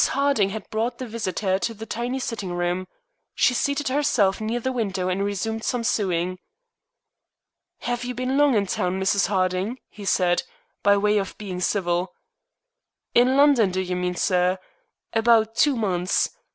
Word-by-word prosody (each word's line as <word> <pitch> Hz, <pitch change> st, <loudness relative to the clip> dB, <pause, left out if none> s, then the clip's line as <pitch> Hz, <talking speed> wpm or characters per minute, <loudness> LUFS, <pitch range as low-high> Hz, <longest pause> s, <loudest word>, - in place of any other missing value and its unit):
Harding 275 Hz, -8 st, +2 dB
had 210 Hz, 0 st, -6 dB
brought 225 Hz, +3 st, -1 dB
the 255 Hz, -, -5 dB
visitor 195 Hz, -4 st, -1 dB
to 230 Hz, +3 st, -2 dB
the 220 Hz, +1 st, -8 dB
tiny 240 Hz, +3 st, -3 dB
sitting 225 Hz, -7 st, -4 dB
room. 175 Hz, +1 st, -1 dB, 0.5 s
She 250 Hz, -, +3 dB
seated 280 Hz, +3 st, 0 dB
herself 245 Hz, -8 st, +2 dB
near 225 Hz, +2 st, -1 dB
the 260 Hz, +2 st, -2 dB
window 195 Hz, -7 st, -2 dB
and 190 Hz, +2 st, 0 dB
resumed 220 Hz, +3 st, -2 dB
some 245 Hz, -2 st, -1 dB
sewing. 185 Hz, -4 st, 0 dB, 1.4 s
"Have 245 Hz, 0 st, -2 dB
you 250 Hz, 0 st, -4 dB
been 255 Hz, +2 st, -1 dB
long 285 Hz, -3 st, +4 dB
in 205 Hz, -2 st, +2 dB
town, 185 Hz, 0 st, -1 dB
Mrs. 195 Hz, +1 st, +2 dB
Harding?" 190 Hz, +4 st, 0 dB
he 210 Hz, -, -10 dB
said, 180 Hz, -2 st, +2 dB, 0.4 s
by 200 Hz, 0 st, +4 dB
way 210 Hz, +1 st, +2 dB
of 195 Hz, -, -5 dB
being 190 Hz, -4 st, -5 dB
civil. 180 Hz, -1 st, -1 dB, 1.0 s
"In 255 Hz, +2 st, +4 dB
London, 280 Hz, -8 st, +5 dB
do 185 Hz, +1 st, -2 dB
you 180 Hz, -1 st, -2 dB
mean, 180 Hz, 0 st, -2 dB
sir? 180 Hz, 0 st, +2 dB, 0.6 s
About 225 Hz, -1 st, +3 dB
two 290 Hz, +1 st, +3 dB
months. 185 Hz, -5 st, 0 dB
205 Hz, 160 wpm, -24 LUFS, 185-240 Hz, 1.4 s, London